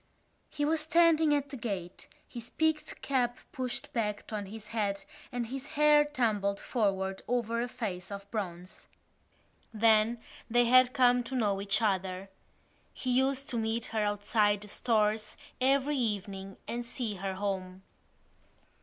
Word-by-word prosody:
He 290 - -2
was 315 +1 +1
standing 320 -1 +4
at 285 -1 -2
the - - -5
gate, 195 -7 -5 0.2
his 235 -2 -9
peaked 315 -1 -1
cap 250 -3 +1
pushed 255 -3 -4
back 210 -2 -2
on 205 -2 -3
his 210 +1 -10
head 205 -3 -2 0.3
and 245 -1 -2
his 265 +4 -6
hair 300 0 +6
tumbled 215 -8 0
forward 195 -5 -1
over 235 -1 0
a 245 - -1
face 205 -7 -5
of 200 0 -6
bronze. 180 -4 -6 0.8
Then 220 +1 +3 0.3
they 240 +1 +4
had 255 +1 +6
come 245 -1 +4
to 265 - -5
know 205 -5 +1
each 200 +3 +1
other. 190 -1 -1 0.6
He 255 - -3
used 265 +2 +1
to 235 - -1
meet 225 +1 0
her 220 - +1
outside 205 0 +1
the 210 - -8
Stores 215 -1 0 0.2
every 275 +2 +3
evening 200 -4 -3
and 240 +1 -3
see 235 -4 -3
her 190 0 -3
home. 190 -1 -4
225 Hz, 145 wpm, -30 LUFS, 200-255 Hz, 0.8 s, hair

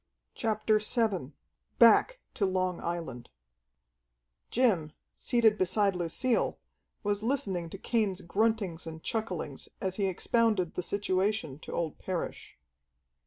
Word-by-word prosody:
CHAPTER 215 -1 +1
VII 210 - 0 0.5
Back - - +6
to - - -2
Long 185 -1 0
Island 165 -8 -4 1.2
Jim, 190 -12 +2 0.2
seated 225 -3 +3
beside 195 +1 +2
Lucille, 180 +8 0 0.5
was 205 0 0
listening 200 -9 -1
to - - -7
Cain's 215 -6 0
gruntings 200 -3 0
and 160 0 -8
chucklings 185 - -3
as 190 -1 -3
he 200 -2 +1
expounded 205 -1 +1
the - - -2
situation 190 -5 -1
to - - -9
old 165 -3 -2
Parrish. 185 -3 -5
195 Hz, 115 wpm, -30 LUFS, 175-220 Hz, 1.2 s, Back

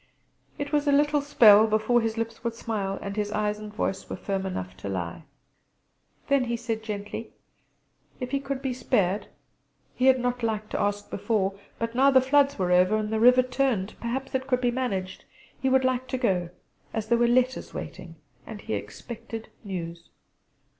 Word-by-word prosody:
It 285 0 -4
was 295 -1 +1
a - - +5
little 295 +1 +3
spell 220 -7 +7
before 220 +3 +2
his 225 0 -2
lips 230 0 -4
would 235 -1 -2
smile, 200 -4 -3
and 200 0 -4 0.2
eyes 210 0 -1
and 215 0 -8
voice 205 -2 -3
were - - -3
firm 195 -1 -3
enough 95 - -5
to 100 - -6
lie. 90 -3 -4 1.0
Then 280 -2 +3
he 235 0 -1
said 225 -2 -3
gently: 210 +1 -6 0.9
If 250 -1 -4
he 275 - +1
could 275 -1 -4
be 265 -2 -1
spared 205 -5 0 0.7
he 255 - +1
had 260 -1 +6
not 245 0 -1
liked 215 -2 -2
to - - -2
ask 205 0 -1
before, 200 -2 0 0.2
but 230 0 -3
now 265 +3 +5
the 265 -1 +6
floods 280 +2 +3
were 180 -3 0
over 180 +3 +5
and 215 0 -2
the 220 - +1
river 250 +2 +7
turned 250 -6 0
perhaps 255 +3 -4
it 260 0 -1
could 250 -2 +2
be 245 -1 +1
managed 195 -8 -3 0.4
he 265 - +2
would 265 0 +4
like 255 0 0
to 260 - -2
go, 185 -8 0 0.5
as 220 -1 -1
there 235 +1 +3
were 240 - +4
letters 255 +1 +1
waiting, 175 -3 -8 0.3
and 215 -2 -8
he - - -4
expected 225 - -7
news. 170 -4 -6
230 Hz, 185 wpm, -26 LUFS, 200-255 Hz, 1.0 s, spell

